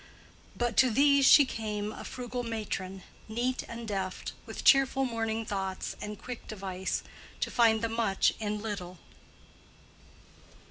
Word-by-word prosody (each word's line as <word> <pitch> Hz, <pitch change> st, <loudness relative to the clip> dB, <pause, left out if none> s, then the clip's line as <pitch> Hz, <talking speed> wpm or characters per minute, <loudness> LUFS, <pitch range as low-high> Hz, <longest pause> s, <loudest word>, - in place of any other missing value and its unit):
But 240 Hz, -3 st, -1 dB
to 260 Hz, -, +6 dB
these 280 Hz, +3 st, +5 dB
She 285 Hz, -, +9 dB
came 210 Hz, -3 st, -3 dB
a -, -, -8 dB
frugal 250 Hz, 0 st, -5 dB
matron, 195 Hz, -5 st, -4 dB, 0.3 s
neat 245 Hz, +3 st, -1 dB
and 230 Hz, 0 st, -6 dB
deft, 190 Hz, -3 st, -3 dB
With -, -, -6 dB
cheerful 270 Hz, -1 st, +5 dB
morning 225 Hz, -2 st, -2 dB
thoughts 190 Hz, -2 st, -3 dB
and 210 Hz, 0 st, -5 dB
quick 250 Hz, -2 st, -8 dB
device 190 Hz, -3 st, -3 dB, 0.4 s
To -, -, -1 dB
find 225 Hz, -2 st, +4 dB
the -, -, +2 dB
much 225 Hz, -4 st, +2 dB
in 210 Hz, -1 st, -3 dB
little. 185 Hz, -5 st, -5 dB
220 Hz, 135 wpm, -30 LUFS, 205-240 Hz, 0.4 s, She